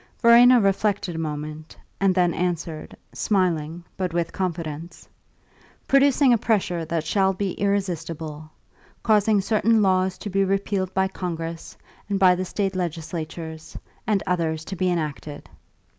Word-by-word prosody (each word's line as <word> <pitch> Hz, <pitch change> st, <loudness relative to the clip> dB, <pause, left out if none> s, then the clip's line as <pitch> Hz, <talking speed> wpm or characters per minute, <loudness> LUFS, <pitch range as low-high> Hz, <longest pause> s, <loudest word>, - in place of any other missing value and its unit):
Verena 240 Hz, +1 st, +7 dB
reflected 195 Hz, -2 st, 0 dB
a 165 Hz, -, -5 dB
moment, 155 Hz, 0 st, -6 dB, 0.2 s
and 195 Hz, -2 st, +2 dB
then 175 Hz, -2 st, +3 dB
answered, 170 Hz, -3 st, -3 dB, 0.2 s
smiling, 175 Hz, -4 st, 0 dB
but 180 Hz, -3 st, -2 dB
with 170 Hz, -1 st, -1 dB
confidence: 170 Hz, -3 st, -5 dB, 0.8 s
"Producing 275 Hz, -1 st, +4 dB
a 235 Hz, -, +2 dB
pressure 190 Hz, -7 st, 0 dB
that 160 Hz, -1 st, -2 dB
shall 195 Hz, +3 st, +2 dB
be 190 Hz, 0 st, -2 dB
irresistible. 165 Hz, -6 st, -3 dB, 0.5 s
Causing 215 Hz, -1 st, +3 dB
certain 220 Hz, +2 st, +2 dB
laws 185 Hz, -1 st, +2 dB
to 205 Hz, -, -6 dB
be 195 Hz, +1 st, +2 dB
repealed 195 Hz, -1 st, -1 dB
by 190 Hz, 0 st, +2 dB
Congress 165 Hz, -3 st, -6 dB, 0.3 s
and 200 Hz, -, 0 dB
by 185 Hz, -1 st, +6 dB
the 185 Hz, +1 st, -2 dB
State 195 Hz, +1 st, -2 dB
legislatures, 160 Hz, -2 st, -5 dB, 0.3 s
and 210 Hz, -2 st, +1 dB
others 160 Hz, -3 st, -1 dB
to 195 Hz, -, -5 dB
be 185 Hz, 0 st, 0 dB
enacted." 150 Hz, -3 st, -4 dB
180 Hz, 135 wpm, -24 LUFS, 165-195 Hz, 0.8 s, Verena